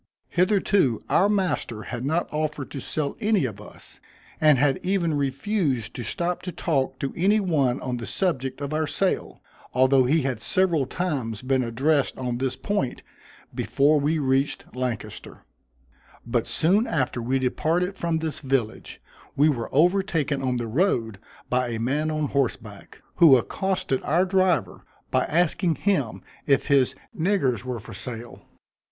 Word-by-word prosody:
Hitherto 185 - +2
our 195 +3 +4
master 185 - -1
had 120 0 -5
not 160 +5 0
offered 150 -2 -3
to 140 - -5
sell 145 +2 -2
any 210 - +2
of 105 -4 -6
us, - - -14 0.4
and 155 -3 +6
had 135 0 +2
even 180 -4 0
refused 140 - -1
to - - -6
stop 170 +11 -2
to 180 - -5
talk 135 -6 -1
to 135 - -3
any 200 +5 +3
one 145 -10 +1
on 125 -1 -3
the 120 - -6
subject 135 -8 -1
of 140 +1 -3
our 155 0 0
sale, 185 +6 -1 0.3
although 130 0 +4
he 150 +4 +2
had 130 -5 -2
several 165 - +2
times 130 - -3
been 130 0 +1
addressed 135 +5 +1
on 125 -2 -3
this 130 -1 -1
point, 200 -12 -2 0.5
before 145 +2 +2
we 150 +3 +1
reached 135 -1 0
Lancaster; 125 -3 -5 0.8
but 120 -1 -1
soon 200 +8 +2
after 130 -5 -1
we 130 +3 0
departed 165 +8 0
from 170 -3 -1
this 160 -1 -3
village, 130 -5 -2 0.4
we 150 +3 +4
were 120 -6 -2
overtaken 165 -3 +2
on 130 -1 0
the 120 - -2
road 115 - 0 0.3
by 125 0 +1
a 115 -2 -3
man 145 +7 0
on 155 -1 -1
horseback, 115 -7 -3
who 160 -7 +8
accosted 180 +1 -1
our 175 +5 +2
driver 185 -2 +1 0.3
by - - +2
asking 175 +1 +1
him 135 - -1 0.2
if 140 0 +2
his 130 -2 +3 0.2
niggars 155 - +1
were 125 -2 -4
for 110 - -11
sale. 120 -1 -7
140 Hz, 155 wpm, -25 LUFS, 125-170 Hz, 0.8 s, who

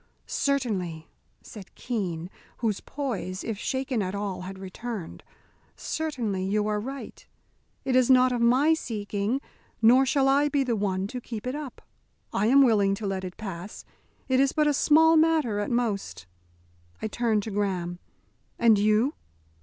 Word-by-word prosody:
"Certainly," 195 - -1 0.4
said 200 -4 -12
Keene, 185 -8 -4 0.3
whose 220 -4 -1
poise, 195 -10 -4
if 220 -3 -4
shaken 260 -2 -1
at 185 0 -3
all, 200 -2 -3
had 190 +1 -7
returned, 195 0 -7 0.5
"certainly, 240 -12 -3
you 205 +2 0
are 210 0 0
right. 270 +5 -7 0.6
It 260 -2 +1
is 255 -1 +4
not 255 -1 +6
of 245 -1 -1
my 260 +7 +4
seeking, 215 -2 -2 0.4
nor 250 +4 +5
shall 270 0 +2
I 285 +2 +3
be 285 -2 +1
the 245 -3 0
one 195 -2 -1
to 245 +5 -6
keep 225 -2 -7
it 255 - -2
up. 290 -3 -7 0.5
I 210 - +1
am 275 +3 +6
willing 205 -5 +3
to 210 - -6
let 195 -1 -2
it 180 -1 -7
pass. 195 -2 -7 0.4
It 260 -1 +2
is 275 0 +3
but 305 - +2
a 295 - +3
small 320 +3 +5
matter 310 -10 +2
at 205 - -2
most." 225 - -2 0.7
I - - -2
turned 220 -2 0
to 220 - -5
Graham 185 -4 -2 0.6
"And 225 -3 +5
you?" 215 +7 +3
225 Hz, 160 wpm, -26 LUFS, 195-265 Hz, 0.7 s, not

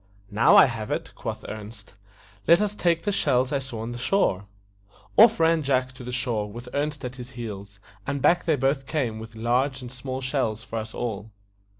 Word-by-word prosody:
"Now 105 +3 +5
I - - +9
have 115 -5 -4
it," - - -3
quoth - - -6
Ernest. 105 -1 -9 0.5
"Let 170 +2 +7
us 210 0 -1
use 170 -2 +4
the 205 - 0
shells 130 -8 +1
I 140 - +1
saw 130 -4 -7
on 115 +2 -4
the 120 - -6
shore." 120 - +1 0.7
Off 225 -2 +7
ran 165 0 +4
Jack 130 -2 0
to 130 - -11
the 125 - -6
shore, 120 -5 -2
with 120 +3 -9
Ernest 145 -1 -2
at 125 0 -6
his 125 -1 -8
heels, 100 -4 -7 0.3
and 140 0 -1
back 175 +6 +3
they 160 -3 +3
both 135 0 0
came 125 -8 -1
with 110 0 -10
large 125 +4 0
and 125 -2 -8
small 130 +1 -5
shells 130 -5 -1
for 115 - -6
us 110 +1 -7
all. 110 -3 -4
125 Hz, 205 wpm, -25 LUFS, 110-140 Hz, 0.7 s, I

